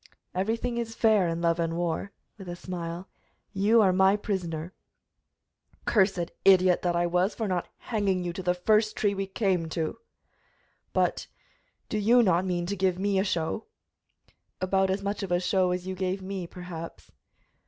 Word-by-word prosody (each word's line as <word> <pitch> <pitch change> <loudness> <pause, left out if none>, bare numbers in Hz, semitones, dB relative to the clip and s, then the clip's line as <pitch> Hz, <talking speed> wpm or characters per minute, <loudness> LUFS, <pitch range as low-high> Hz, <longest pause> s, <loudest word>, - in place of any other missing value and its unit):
"Everything 230 +5 -1
is 225 -1 -4
fair 215 -6 +4
in 165 0 -2
love 170 0 +2
and 165 0 -1
war," 175 +3 -2 0.3
with 190 -2 -8
a 175 - -4
smile. 175 0 -6 0.5
"You 215 +3 +4
are 190 -2 +4
my 190 +2 +5
prisoner." 180 -5 -3 1.1
"Cursed 190 -4 +2
idiot 185 -2 +5
that 175 -1 0
I 175 0 +2
was 180 +4 +1
for 220 - -2
not 180 -2 -1
hanging 200 -5 -1
you 175 -1 -3
to 190 - -5
the 180 -1 +1
first 215 +4 +2
tree 205 -1 +1
we 195 0 -3
came 190 -5 0
to! 165 +7 -3 0.9
But, - - 0 0.6
do 215 - -2
you 235 +4 +5
not 185 -2 +2
mean 175 -1 -1
to 200 +3 -2
give 185 -2 +1
me 195 0 +1
a - - +2
show?" 175 +2 -2 0.9
"About 190 +1 +1
as 195 +1 -1
much 200 +1 -2
of 195 -2 -4
a 175 - +3
show 185 0 +2
as 180 0 -2
you 190 - -3
gave 185 +1 -2
me, 190 -2 -4
perhaps." 165 - -9
185 Hz, 175 wpm, -27 LUFS, 175-200 Hz, 1.1 s, my